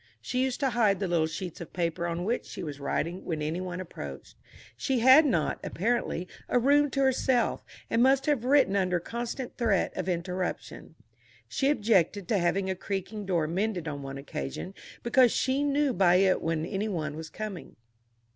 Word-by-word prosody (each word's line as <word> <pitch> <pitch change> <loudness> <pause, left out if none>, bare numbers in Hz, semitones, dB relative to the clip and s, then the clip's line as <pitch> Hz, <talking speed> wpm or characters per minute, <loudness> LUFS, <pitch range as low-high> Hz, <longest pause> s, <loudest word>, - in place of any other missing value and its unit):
She 255 0 -2
used 260 -1 -1
to 270 -2 +2
hide 215 -5 +2
the 195 - -1
little 170 -2 +2
sheets 165 +2 -6
of 170 - -9
paper 170 -1 -1
on 170 +1 -3
which 230 +6 -1
she - - -7
was 145 -3 -6
writing 170 +5 -2
when 160 -3 -3
any 155 +4 -2
one 180 -1 -5
approached. 185 -2 -8 0.4
She 265 -2 -1
had 265 +5 +8
not, 170 - 0
apparently, 195 -3 -1 0.2
a - - +3
room 285 +4 +4
to 275 +1 -1
herself, 260 -2 +2 0.2
and 230 - +1
must 270 +2 +4
have 290 -6 +1
written 260 -6 +4
under 185 -2 +1
constant 235 +7 -5
threat 220 -6 +1
of - - -3
interruption. 180 +1 -4 0.5
She 275 - 0
objected 205 - +2
to 210 - +2
having 190 +2 +1
a 190 - 0
creaking 200 +2 -5
door 170 -4 +1
mended 180 +1 -2
on 145 -1 -4
one 135 0 -6
occasion, 135 - -6 0.3
because 245 0 +5
she 265 +2 +1
knew 285 -1 +1
by 180 -3 +4
it 190 0 +3
when 160 -1 -1
any 195 +4 -2
one 155 -7 -3
was 160 0 -7
coming. 210 -1 -7
195 Hz, 185 wpm, -28 LUFS, 170-245 Hz, 0.5 s, had